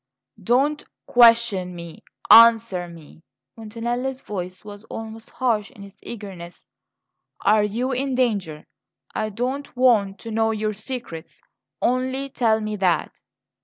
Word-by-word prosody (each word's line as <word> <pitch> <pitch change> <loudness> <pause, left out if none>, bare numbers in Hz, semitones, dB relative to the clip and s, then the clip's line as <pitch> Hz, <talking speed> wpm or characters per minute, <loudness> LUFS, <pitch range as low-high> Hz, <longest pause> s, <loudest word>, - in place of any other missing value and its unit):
"Don't 275 +5 +1 0.2
question 230 -6 +4
me 170 -1 -9 0.3
answer 225 -6 +6
me!" 165 -2 -14 0.3
Montanelli's 240 +4 -4
voice 185 -1 -7
was 205 0 -10
almost 225 0 -8
harsh 225 -5 -1
in 200 - -14
its 200 0 -15
eagerness. 190 -6 -9 0.8
"Are 210 0 +4
you 235 +6 -2
in 265 +1 -1
danger? 200 -12 -1 0.5
I 215 - -2
don't 250 +6 -4
want 215 -6 +3
to 230 - -7
know 225 0 +1
your 215 -1 -2
secrets; 215 -7 -8 0.4
only 260 +2 0
tell 225 -4 +1
me 215 0 -4
that!" 180 -5 +1
220 Hz, 125 wpm, -22 LUFS, 195-245 Hz, 0.8 s, answer